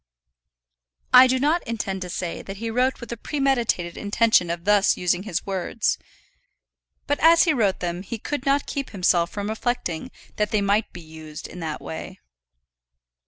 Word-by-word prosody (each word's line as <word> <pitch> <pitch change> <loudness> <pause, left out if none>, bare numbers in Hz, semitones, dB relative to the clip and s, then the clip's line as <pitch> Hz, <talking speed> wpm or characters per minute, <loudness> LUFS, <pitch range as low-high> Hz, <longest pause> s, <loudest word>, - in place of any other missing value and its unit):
I 255 +1 +10
do 260 +1 +2
not 305 +6 +2
intend 200 -4 -3
to 180 - -5
say 175 -1 -4
that 195 0 -8
he 225 +2 -4
wrote 255 +3 +1
with 235 -2 -9
a 235 - -4
premeditated 240 - 0
intention 210 -3 +2
of 170 +1 -4
thus 205 -1 +4
using 180 0 +1
his 175 -1 -2
words; 195 +3 -1 1.1
but 290 - 0
as 330 +1 +6
he 325 - +3
wrote 210 -8 +1
them 175 0 -3
he 215 +4 -6
could 275 +4 -4
not 275 0 +2
keep 275 -1 -4
himself 175 -3 +2
from 205 0 -4
reflecting 220 -3 -2 0.3
that 210 -1 +1
they 215 - +1
might 205 +2 +1
be 175 - -10
used 155 -1 -10
in 180 - -10
that 160 -3 -4
way. 185 +4 -7
205 Hz, 170 wpm, -24 LUFS, 180-250 Hz, 1.1 s, I